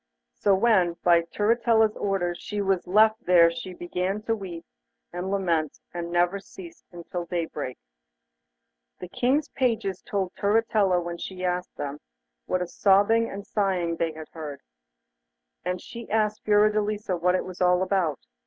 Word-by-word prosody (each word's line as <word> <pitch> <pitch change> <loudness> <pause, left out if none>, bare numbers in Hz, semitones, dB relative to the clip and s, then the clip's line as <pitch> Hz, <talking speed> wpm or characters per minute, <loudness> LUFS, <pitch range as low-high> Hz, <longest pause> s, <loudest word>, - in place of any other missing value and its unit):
So 200 -1 +2
when, 190 -5 +3
by 170 -1 +5
Turritella's 220 +4 +2
orders, 175 -3 -1
she 210 -1 -5
was 195 -3 0
left 215 +3 +4
there 170 -2 +6
she 175 +2 -7
began 180 +4 -3
to 225 0 0
weep 175 -5 -8 0.5
and 180 +2 -4
lament, 170 -6 0 0.2
and 170 -1 -4
never 175 +3 +2
ceased 340 - -13
until 175 0 -6
daybreak. 160 -7 -4 1.2
The 180 - -8
King's 275 +8 +1
pages 225 -7 -1
told 190 -3 -3
Turritella, 205 -3 +2
when 170 0 -5
she 185 -1 -5
asked 180 0 -2
them, 145 0 -5 0.5
what 180 0 0
a - - -6
sobbing 205 +5 +3
and 200 0 -7
sighing 180 -5 0
they 165 -1 -1
had 155 0 -10
heard, 150 -4 -8 1.0
and 180 0 -2
she 235 +4 -10
asked 215 0 0
Fiordelisa 210 -1 +2
what 180 +1 +2
it - - -1
was 185 -1 -9
all 180 0 +4
about. 185 -6 0
185 Hz, 150 wpm, -26 LUFS, 175-210 Hz, 1.2 s, there